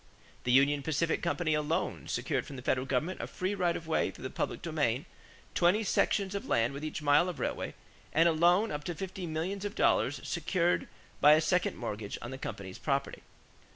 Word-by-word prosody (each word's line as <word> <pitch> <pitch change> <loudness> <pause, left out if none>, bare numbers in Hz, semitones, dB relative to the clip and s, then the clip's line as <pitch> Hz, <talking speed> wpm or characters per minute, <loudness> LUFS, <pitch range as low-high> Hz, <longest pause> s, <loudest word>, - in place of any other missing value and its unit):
The 125 - +2
Union 140 +3 +4
Pacific 160 +3 0
Company 170 -2 0
alone 150 +1 -1
secured - - -1
from 140 - -8
the 125 - -8
federal 130 0 0
government 150 +8 -1
a - - -4
free 185 +2 -2
right 180 -3 +1
of 165 - -9
way 160 - +1
through - - -11
the - - -4
public - - -3
domain, - - 0 0.5
twenty 180 +6 +3
sections 200 -1 +1
of 200 - -4
land 115 +3 +2
with 140 +2 -6
each 155 0 -4
mile 145 +5 +4
of 175 - -6
railway, - - -3 0.4
and 165 +2 +4
a - - +5
loan 175 +7 +3
up 150 0 -4
to 175 - -3
fifty 185 +1 -5
millions 170 +5 -3
of 205 +1 -4
dollars - - +2
secured 175 -2 0 0.3
by 150 +1 +8
a 155 - +5
second 175 +3 +1
mortgage 105 -3 -4
on 120 - -7
the 130 - -7
company's 100 -6 -6
property. 140 -1 -1
160 Hz, 200 wpm, -31 LUFS, 140-180 Hz, 0.5 s, by